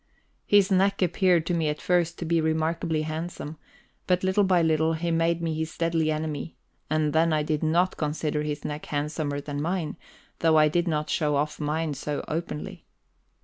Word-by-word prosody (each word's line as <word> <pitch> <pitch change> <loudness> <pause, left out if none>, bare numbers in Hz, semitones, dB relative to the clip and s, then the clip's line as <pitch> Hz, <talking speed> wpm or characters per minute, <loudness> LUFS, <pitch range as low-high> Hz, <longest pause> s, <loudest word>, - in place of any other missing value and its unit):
His 205 -1 +4
neck 195 +1 +3
appeared 180 -1 +3
to 175 - -1
me 165 -3 +1
at 150 - -3
first 175 -1 +1
to 170 - -4
be 165 0 +2
remarkably 160 0 0
handsome; 155 0 -5 0.5
but 180 0 +2
little 190 +2 +3
by 185 -3 +3
little 160 0 +2
he 170 +1 -2
made 165 +1 +1
me 165 -1 0
his 160 0 -4
deadly 165 -2 +1
enemy, 155 +1 -3 0.3
and 155 -1 +1
then 165 +1 +3
I 155 -1 +2
did 150 0 -1
not 170 +4 +2
consider 150 0 -1
his 150 -1 -4
neck 150 0 -5
handsomer 145 0 -2
than 145 0 -4
mine, 170 0 -2 0.4
though 160 -1 +4
I 155 0 +6
did 175 +3 0
not 150 -2 -1
show 150 -2 +1
off 150 +2 -1
mine 155 +1 -1
so 145 +1 -4
openly. 160 -1 -5
160 Hz, 185 wpm, -26 LUFS, 150-170 Hz, 0.5 s, I